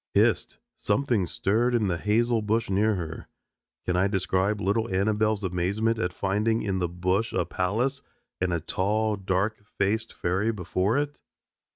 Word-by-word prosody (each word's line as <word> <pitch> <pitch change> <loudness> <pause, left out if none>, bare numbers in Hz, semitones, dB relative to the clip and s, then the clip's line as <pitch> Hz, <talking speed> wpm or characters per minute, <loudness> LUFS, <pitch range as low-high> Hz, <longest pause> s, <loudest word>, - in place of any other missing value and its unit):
Hist! - - +2 0.2
Something 110 -4 +1
stirred 115 +8 +1
in 115 -3 +2
the 85 -3 -1
hazel 115 +2 +2
bush 105 0 0
near 105 +2 +3
her. 80 -3 -6 0.6
Can 90 - 0
I 95 +2 +3
describe 95 +1 0
little 105 +3 0
Annabelle's 105 +2 +1
amazement 100 +5 0
at 90 -4 0
finding 105 +5 0
in 95 -2 -1
the 90 -2 0
bush 90 +5 0
a - - +1
palace 120 +10 -1 0.4
and 90 -1 0
a 85 - +1
tall 105 +6 0
and 100 -2 -6
dark 100 +3 0
faced 110 +3 -1
fairy 95 +6 0
before 95 +2 0
it? 145 0 -2
105 Hz, 160 wpm, -27 LUFS, 95-110 Hz, 0.6 s, near